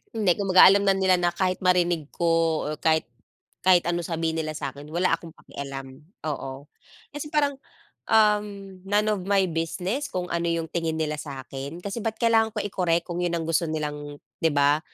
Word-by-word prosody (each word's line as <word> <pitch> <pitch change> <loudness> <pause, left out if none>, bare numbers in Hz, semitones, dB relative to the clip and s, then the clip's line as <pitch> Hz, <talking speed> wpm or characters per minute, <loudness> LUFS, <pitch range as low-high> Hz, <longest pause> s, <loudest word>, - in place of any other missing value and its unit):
Hindi, 210 -5 +3
kumbaga 190 -2 +6
alam 200 +1 +6
na 195 - +5
nila 190 -1 +3
na 175 -1 0
kahit 185 0 0
marinig 175 -4 +2
ko 165 -2 +1
o - - -3
kahit 160 -1 +2 0.6
kahit 180 -2 +5
anong 175 -1 -1
sabihin 165 -1 -1
nila 155 -1 -3
sa 140 -3 -4
akin, 145 +1 -11
wala 175 +3 +1
akong 165 -1 -8
pakialam, 135 -1 -8 0.3
oo. 140 -2 -5 0.5
Kasi 295 +1 -6
parang 290 -2 +2 0.5
uhm 210 -3 +2
none 205 +1 +3
of 205 - -2
my 195 -1 +4
business 180 - -2
kung 180 -8 -3
ano 170 0 0
yung 170 -1 0
tingin 165 -2 -1
nila 155 -1 -1
sa 135 -3 -7
akin. 140 +4 -6
Kasi 200 +4 -4
bakit 220 0 -3
kailangan 225 -1 +4
ko - - -6
i-correct 180 -4 0
kung 175 -1 -4
yun 175 -1 0
ang 165 - -3
gusto 165 +1 +1
nilang 150 -2 -4 0.3
'di 165 - +4
ba, 145 +1 +3
170 Hz, 190 wpm, -25 LUFS, 155-195 Hz, 0.6 s, kumbaga